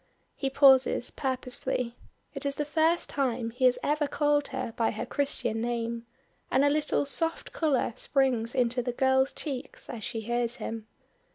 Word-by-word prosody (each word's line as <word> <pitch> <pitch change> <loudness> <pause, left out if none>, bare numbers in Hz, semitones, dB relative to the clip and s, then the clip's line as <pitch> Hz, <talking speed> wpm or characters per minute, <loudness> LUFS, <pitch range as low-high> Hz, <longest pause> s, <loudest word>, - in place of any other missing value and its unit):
He 270 - -1
pauses, 265 -2 +5
purposely. 250 -2 -2 0.4
It - - -1
is 280 0 0
the 295 - -2
first 320 +3 +2
time 245 -4 -1
he 255 +2 0
has 250 -1 +5
ever 295 0 +1
called 290 0 +1
her 255 -3 -4
by 230 - +1
her 215 - -4
Christian 275 -5 -1
name, 235 0 -3 0.4
and 270 +2 +3
a - - +5
little 300 -1 +1
soft 325 +3 -1
color 290 -7 +1
springs 255 -4 +1
into 245 -1 +2
the 245 0 -3
girl's 265 +1 +3
cheeks 270 -3 -6
as 230 -4 -7
she 225 - -3
hears 240 +1 -1
him. 225 -3 -6
260 Hz, 165 wpm, -28 LUFS, 235-285 Hz, 0.4 s, pauses